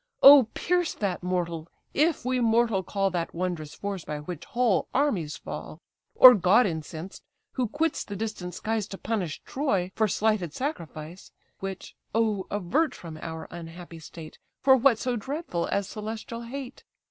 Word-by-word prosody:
O 275 -4 +10
pierce 355 -1 0
that 195 -4 -2
mortal! 170 -3 -2 0.3
if 310 -2 +2
we 255 0 +1
mortal 230 -3 +3
call 195 +1 -1
That 170 -2 -3
wondrous 170 -4 -3
force 200 -3 -4
by 150 - -4
which 165 +1 -7
whole 245 -6 +1
armies 205 - +1
fall; 150 +1 -7 0.4
Or 255 -1 +11
god 200 +4 +4
incensed, 160 0 -5 0.3
who 255 -3 -1
quits 305 +7 -1
the 205 - -7
distant 200 -4 -4
skies 220 -2 -2
To 195 - -7
punish 195 -9 -3
Troy 200 -10 -1
for 220 - +2
slighted 205 -6 0
sacrifice; 170 - -6 0.3
(Which, 195 -1 -6 0.2
oh 215 -4 +1
avert 240 - 0
from 165 -2 -9
our 160 0 -6
unhappy 170 0 -9
state! 160 0 -11 0.2
For 265 0 +7
what 260 -2 +4
so 250 +1 -1
dreadful 265 - -3
as 200 -1 -1
celestial 220 +2 -6
hate)? 260 +2 -7
200 Hz, 155 wpm, -27 LUFS, 175-245 Hz, 0.4 s, Or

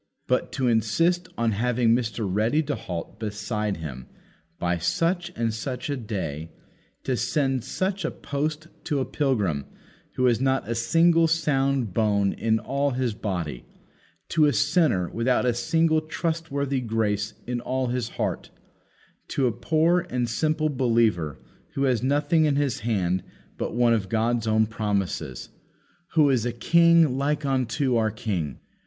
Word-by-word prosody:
But - - 0
to 130 - 0
insist 165 - +2
on 115 -1 +1
having 120 +2 +1
Mr. 115 -3 -1
Ready 110 +11 +1
to 145 0 -2
halt 90 +1 -6
beside 105 -1 -3
Him 65 -6 -7 0.5
by 85 0 -1
such 170 - 0
and 115 -1 -1
such 130 +6 -4
a - - 0
day; 90 - -4 0.5
to 130 - 0
send 135 -1 0
such 190 +8 -2
a 165 - 0
post 150 +3 -3 0.2
to 145 - 0
a 130 - 0
pilgrim 105 - 0 0.5
who 130 - +1
has 120 -1 +3
not 135 0 +1
a 115 - -1
single 165 +8 +4
sound 140 - +1
bone 100 -2 +2
in 110 -1 +1
all 140 +5 -1
his 125 -4 0
body; 90 - -4 0.7
to 160 -3 +4
a 145 - +3
sinner 145 - +2
without 125 +5 +1
a 125 - +3
single 160 +7 +2
trustworthy 155 -4 -2
grace 110 -2 -1
in 120 0 -3
all 130 +1 -1
his 120 -2 -2
heart; - - -2 0.8
to 135 - 0
a 120 - +3
poor 160 +9 +1
and 125 -1 -1
simple 155 +5 0
believer 115 - +1 0.4
who 135 - 0
has 125 -4 +2
nothing 145 +4 +2
in 145 -2 +2
his 140 -3 0
hand 95 -5 0 0.3
but - - -4
one 120 -1 +4
of 100 -4 -1
God's 115 +1 0
own 110 0 +3
promises 100 - -3 0.6
Who 150 -3 +5
is 125 -4 +2
a 120 - -1
king 165 +2 +4
like 150 +1 0
unto 130 -1 +1
our 110 -1 +2
King? 95 - -3
125 Hz, 155 wpm, -25 LUFS, 110-145 Hz, 0.8 s, Who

